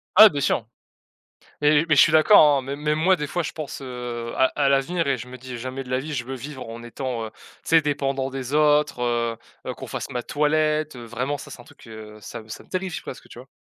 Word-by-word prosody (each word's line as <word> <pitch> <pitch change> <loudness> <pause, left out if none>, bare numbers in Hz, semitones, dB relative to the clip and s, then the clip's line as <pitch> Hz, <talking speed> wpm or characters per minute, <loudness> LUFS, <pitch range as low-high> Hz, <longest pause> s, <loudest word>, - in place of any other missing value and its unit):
Ah 215 +3 +11
bien 145 -6 -3
sûr. 115 - +1 1.0
Mais 150 +2 +4
mais 155 - +5
je - - +8
suis - - +6
d'accord, 155 -3 +7
hein, 135 - -1
mê 135 +2 -5
même 150 +1 -1
moi, 185 +3 +4
des 150 -4 -4
fois, 175 +5 -2
je - - -4
pense, 150 -3 -7
heu, 120 -2 -5
à 130 - +4
à 140 -2 +2
l'avenir 150 +5 +1
et 135 -2 +1
je 120 +1 -8
me 125 0 -9
dis: 125 0 -8
«Jamais 130 +2 -5
de 125 - -13
la 130 0 +1
vie 150 +3 -6
je 120 -4 -2
veux 135 +1 -5
vivre 130 0 -8
en 115 +1 -8
étant, 120 -1 -4
heu, - - -6
tu - - -24 0.2
sais, 165 0 +4
dépendant 135 -2 -1
des 135 0 -5
autres, 150 -3 +3
heu 120 -1 0 0.3
heu, - - -2
qu'on - - -9
fasse - - -5
ma 125 -1 -3
toilette, 155 0 +1
heu», 120 - -9
vraiment 125 +5 -3
ça - - -10
c'est 120 - -10
un - - -15
truc, 120 - -18
heu, 110 -1 -10
ça 115 +3 -8
me 110 - -18
ça - - -8
me - - -26
terrifie 185 -1 -3
presque, - - -9
tu - - -11
vois? 130 - -13
135 Hz, 265 wpm, -24 LUFS, 125-150 Hz, 1.0 s, Ah